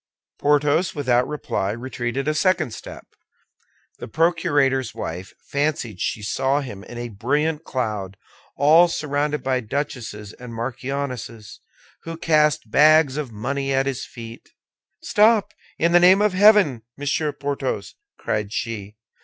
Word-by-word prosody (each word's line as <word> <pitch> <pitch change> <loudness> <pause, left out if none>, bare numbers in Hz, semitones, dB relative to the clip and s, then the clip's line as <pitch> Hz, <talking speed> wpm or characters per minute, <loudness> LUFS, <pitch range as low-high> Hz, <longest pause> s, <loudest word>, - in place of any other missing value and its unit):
Porthos, 150 +4 +2
without 125 -3 +1
reply, 145 -9 -2
retreated 120 +2 -4
a 155 - +2
second 170 - +1
step. - - -10 0.9
The - - -7
procurator's 145 -5 +1
wife 90 -4 -6 0.2
fancied 140 - -1
she 105 - -2
saw 135 +7 0
him 105 -8 -8
in 120 - -10
a 120 0 -5
brilliant 145 +9 -1
cloud, 105 -7 -3 0.4
all 160 +5 +6
surrounded 150 -2 -2
by 130 -1 +1
duchesses 115 -4 -5
and 125 -2 -10
marchionesses, 125 -2 -5 0.4
who 165 0 -7
cast 150 -8 +2
bags 155 -2 +5
of 145 -5 -4
money 135 +6 -3
at 135 0 +2
his 135 -5 -3
feet. 115 -1 -10 0.5
"Stop, 210 -1 +3 0.2
in 170 +1 +2
the 175 - +6
name 185 +3 +6
of 210 -3 +2
heaven, 195 - +5 0.2
Monsieur 145 +2 -1
Porthos!" 140 -9 -4 0.2
cried 105 -1 -2
she. 105 -3 -4
135 Hz, 130 wpm, -22 LUFS, 115-155 Hz, 0.9 s, all